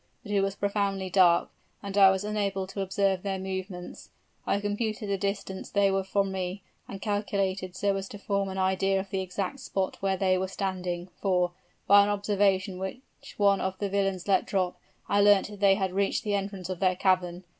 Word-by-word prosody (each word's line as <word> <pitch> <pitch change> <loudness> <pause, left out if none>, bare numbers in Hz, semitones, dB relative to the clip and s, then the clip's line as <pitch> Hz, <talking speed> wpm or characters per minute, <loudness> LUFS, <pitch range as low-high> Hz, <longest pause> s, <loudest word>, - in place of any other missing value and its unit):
But 205 - -8
it 200 -1 +3
was 195 0 -1
profoundly 200 -2 -1
dark, 175 -3 +4 0.3
and 200 -1 -5
I 195 -1 +8
was 190 0 0
unable 200 -2 -1
to 195 +1 -5
observe 195 -1 +1
their 195 -1 -2
movements. 190 -1 -6 0.4
I 200 - +2
computed 210 +1 -2
the 200 - +1
distance 200 -1 -3
they 200 -1 +3
were 195 0 +1
from 195 0 0
me, 190 +1 -4 0.2
and 195 - -7
calculated 195 -3 -2
so 200 0 +1
as 195 0 -4
to 205 - -8
form 200 -1 -1
an 190 - -5
idea 190 +1 +1
of 195 +1 -6
the 190 -2 -1
exact 190 +7 -4
spot 195 -6 -2
where 195 -1 +1
they 185 -1 +2
were 190 - -1
standing; 185 -2 -3
for, 180 -3 +2 0.3
by 200 0 +7
an 200 - +2
observation 200 -2 +1
which 190 +8 -8
one 200 -1 +3
of 190 0 -2
the 200 +1 -2
villains 195 -2 -1
let 190 -2 +2
drop, 185 -2 0 0.3
I 200 0 +3
learnt 205 -1 +5
that 205 -1 -10
they 195 -1 +5
had 190 -2 -1
reached 195 +1 0
the 210 - -1
entrance 195 -2 -3
of 185 -2 -4
their 185 -1 +2
cavern. 180 -1 +1
195 Hz, 200 wpm, -28 LUFS, 190-200 Hz, 0.4 s, I